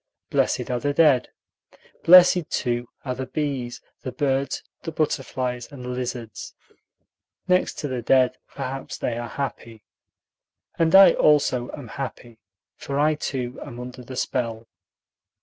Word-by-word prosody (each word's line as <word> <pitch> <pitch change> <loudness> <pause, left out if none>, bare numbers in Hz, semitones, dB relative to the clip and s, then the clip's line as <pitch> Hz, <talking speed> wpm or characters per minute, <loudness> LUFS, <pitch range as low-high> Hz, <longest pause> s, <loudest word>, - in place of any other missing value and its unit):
Blessed - - +1
are 125 - 0
the 145 +2 -1
dead. 150 -6 +4 0.7
Blessed, 180 -1 +7
too, 120 -1 -1 0.2
are 130 - -1
the 130 +1 -5
bees, 135 -5 -3 0.2
the 130 - -5
birds, 135 -1 -1 0.2
the 165 - -5
butterflies, 130 -4 -2
and 130 -3 -9
the - - -5
lizards. 125 -3 -5 0.9
Next 180 0 +2
to 150 - -3
the 130 -3 -3
dead, 130 +1 +3
perhaps, 135 0 -6
they 120 - -2
are 120 0 -5
happy. 115 -5 -6 1.0
And 165 +1 +4
I 195 -2 +10
also 140 -5 +3
am 140 -5 -8
happy, 120 -2 -7 0.4
for 140 - -4
I 155 +1 +4
too 130 -4 -4
am 120 - -9
under 125 +1 -8
the 130 +1 -9
spell. 115 -3 -2
130 Hz, 140 wpm, -24 LUFS, 120-145 Hz, 1.0 s, I